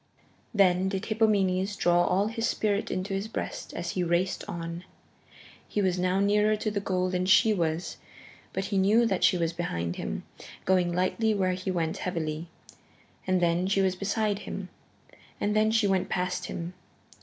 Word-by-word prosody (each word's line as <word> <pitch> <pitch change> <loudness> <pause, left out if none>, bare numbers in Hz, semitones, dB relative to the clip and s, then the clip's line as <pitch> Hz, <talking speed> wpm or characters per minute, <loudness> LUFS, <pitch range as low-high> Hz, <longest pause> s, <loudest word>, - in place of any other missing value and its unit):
Then 190 -3 +3
did 195 +2 -3
Hippomenes 205 -3 +1
draw 175 -2 +3
all 190 +3 +2
his 225 +1 -1
spirit 205 -1 0
into 185 +2 -3
his 195 +2 -2
breast 220 - -5
as 170 0 -3
he 180 - -1
raced 175 +2 0
on. 170 -2 -5 0.8
He - - -2
was 185 -2 +1
now 185 +1 +1
nearer 210 +2 +3
to 215 0 -2
the 205 - -1
goal 185 -2 -1
than 180 0 0
she 195 +3 +5
was. 165 -2 -2 0.5
But 190 - -2
he 195 0 0
knew 215 +5 +4
that 195 -5 0
she 180 - +5
was 165 -1 0
behind 85 - -3
him, - - -4 0.4
going 180 -2 +3
lightly 200 +5 +1
where 185 -2 +1
he 185 +1 -4
went 165 -3 -1
heavily. 165 -2 -3 0.8
And 185 -1 +2
then 170 +2 +2
she 195 0 +2
was 185 -1 +1
beside 205 +1 -1
him, 195 -2 -6 0.7
and 210 +1 0
then 215 0 +4
she 225 -1 +2
went 190 -2 +1
past 180 0 -1
him. 170 +1 -5
190 Hz, 175 wpm, -28 LUFS, 175-205 Hz, 0.8 s, she